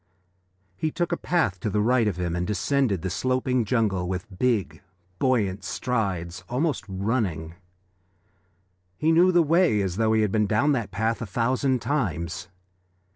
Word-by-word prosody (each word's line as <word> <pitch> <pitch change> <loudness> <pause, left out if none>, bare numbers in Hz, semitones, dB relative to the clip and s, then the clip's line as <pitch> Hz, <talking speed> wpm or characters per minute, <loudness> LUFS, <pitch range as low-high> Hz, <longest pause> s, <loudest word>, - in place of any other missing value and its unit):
He 155 - -1
took 175 +2 -2
a - - +2
path 160 - 0
to 105 - -2
the 105 - 0
right 115 +1 +3
of 100 -5 -1
him 85 -1 -2
and 90 0 -2
descended 105 - 0
the 95 - -2
sloping 130 0 0
jungle 100 -5 0
with 95 +1 -5
big, 105 -11 0 0.4
buoyant 105 -7 +1
strides, 95 -8 -2
almost 140 +3 0
running; 95 -5 -2 1.4
he 160 +1 +2
knew 175 +3 +5
the 175 -1 +4
way 165 - +3
as 95 -2 -2
though 110 0 +2
he 110 - +3
had 105 - 0
been 105 -1 +2
down 115 +8 +2
that 120 -7 -1
path 110 +3 -1
a 115 - -4
thousand 125 +5 0
times. 90 - -2
110 Hz, 160 wpm, -25 LUFS, 95-130 Hz, 1.4 s, knew